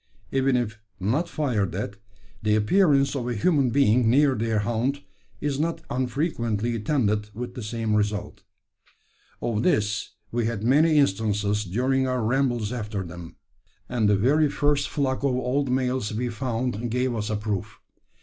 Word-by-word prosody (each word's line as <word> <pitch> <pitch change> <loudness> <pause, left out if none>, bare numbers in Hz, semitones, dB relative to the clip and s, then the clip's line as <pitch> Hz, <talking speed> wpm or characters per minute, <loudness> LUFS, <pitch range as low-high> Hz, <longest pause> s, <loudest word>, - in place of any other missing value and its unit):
Even 135 -1 +2
if 110 -3 -3 0.2
not 130 - 0
fired 110 - -1
at, 100 0 -3 0.5
the 105 0 +2
appearance 140 - +3
of 125 -3 -2
a 120 - -1
human 140 - +2
being 125 -2 +3
near 140 +3 +4
their 110 -1 0
haunt 120 +6 -1 0.4
is 145 -1 -2
not 165 +1 -1
unfrequently 120 -4 -1
attended 105 -3 0
with 120 +1 -5
the 125 - -7
same 110 0 -2
result. 105 0 -1 1.0
Of 110 -2 0
this 105 - 0 0.2
we 120 -1 0
had 110 -3 -3
many 150 +6 +4
instances 105 -4 +1
during 130 +7 +1
our 125 -2 0
rambles 120 -2 0
after 105 -4 -3
them, 85 -1 -9 0.5
and 115 -4 +1
the 105 - +4
very 145 +8 +3
first 145 0 +1
flock 135 -3 0
of 135 -3 +2
old 130 +2 0
males 125 -3 0
we 120 +3 -2
found 120 -1 -2
gave 125 +2 0
us 105 -2 -3
a 110 - 0
proof. 105 0 -3
120 Hz, 155 wpm, -25 LUFS, 105-135 Hz, 1.0 s, near